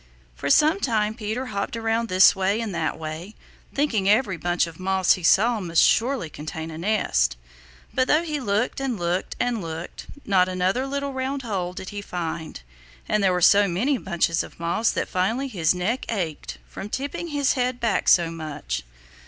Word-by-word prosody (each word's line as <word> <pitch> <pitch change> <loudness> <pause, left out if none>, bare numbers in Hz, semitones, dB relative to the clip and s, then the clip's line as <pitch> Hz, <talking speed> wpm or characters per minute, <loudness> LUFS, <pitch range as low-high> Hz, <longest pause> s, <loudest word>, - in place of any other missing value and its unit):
For 140 - -3
some 310 - +5
time 215 - 0
Peter 220 +3 -4
hopped 210 -1 -3
around 225 0 0
this 185 +2 +6
way 195 +3 +1
and 225 -4 -3
that - - -1
way, 160 +6 -7 0.4
thinking 225 -9 +1
every 210 -2 +3
bunch 175 +1 0
of 165 0 -11
moss 190 0 +3
he 185 - -5
saw 220 +7 +4
must 170 -4 +2
surely 235 -2 +2
contain 155 +2 -7
a 155 - -7
nest. 65 - +1 0.6
But 255 - +2
though 310 +3 +3
he 305 -3 -3
looked 220 0 -1
and 260 -4 -1
looked 175 +2 -2
and 240 -3 0
looked, 165 0 -7 0.2
not 185 -2 +3
another 185 +8 0
little 280 0 -3
round 265 +1 -3
hole 185 -6 -3
did 185 +1 -7
he 205 0 -6
find, 165 - -5 0.4
and 215 - +1
there 190 - +4
were 180 0 0
so 200 +4 +6
many 235 +10 0
bunches 170 -2 0
of - - -10
moss 170 +7 +1
that - - -1
finally 220 +9 0
his 180 -8 +1
neck 210 +9 -2
ached 160 - -4
from 195 - -8
tipping 280 +8 -4
his 290 -4 +1
head 250 -1 -1
back 220 -5 0
so 170 -2 +5
much. 155 - -5
200 Hz, 185 wpm, -24 LUFS, 175-245 Hz, 0.6 s, this